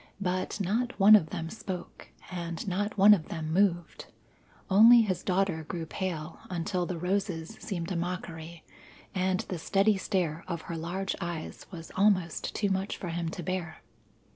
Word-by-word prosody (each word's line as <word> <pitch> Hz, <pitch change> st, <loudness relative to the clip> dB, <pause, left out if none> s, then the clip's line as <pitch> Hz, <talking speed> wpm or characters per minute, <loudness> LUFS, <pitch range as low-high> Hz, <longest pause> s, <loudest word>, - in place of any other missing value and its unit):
But 185 Hz, +1 st, -2 dB
not 225 Hz, +6 st, -1 dB
one 205 Hz, +2 st, +9 dB
of 160 Hz, -7 st, +3 dB
them 165 Hz, +2 st, -5 dB
spoke, 185 Hz, -5 st, -7 dB, 0.2 s
and 170 Hz, 0 st, -5 dB
not 205 Hz, +3 st, -2 dB
one 200 Hz, +2 st, +9 dB
of 170 Hz, -6 st, 0 dB
them 160 Hz, -1 st, -4 dB
moved; 175 Hz, -3 st, +1 dB, 0.6 s
only 225 Hz, +5 st, +8 dB
his 185 Hz, -4 st, -1 dB
daughter 185 Hz, -4 st, 0 dB
grew 165 Hz, +1 st, -5 dB
pale 165 Hz, -2 st, -4 dB
until 180 Hz, 0 st, -2 dB
the 180 Hz, -, -3 dB
roses 180 Hz, 0 st, -2 dB
seemed 175 Hz, -4 st, -4 dB
a -, -, -1 dB
mockery, 170 Hz, -2 st, -5 dB, 0.5 s
and 185 Hz, 0 st, +1 dB
the 180 Hz, -, -5 dB
steady 195 Hz, +5 st, +2 dB
stare 180 Hz, -4 st, -1 dB
of 170 Hz, -3 st, -4 dB
her 170 Hz, -, -5 dB
large 180 Hz, +4 st, -3 dB
eyes 170 Hz, -2 st, -5 dB
was 165 Hz, -4 st, -9 dB
almost 190 Hz, -4 st, +1 dB
too 205 Hz, -, +1 dB
much 190 Hz, +1 st, -1 dB
for 180 Hz, -, -5 dB
him 170 Hz, 0 st, -2 dB
to 175 Hz, +1 st, -6 dB
bear. 180 Hz, -1 st, -4 dB
180 Hz, 165 wpm, -29 LUFS, 170-195 Hz, 0.6 s, one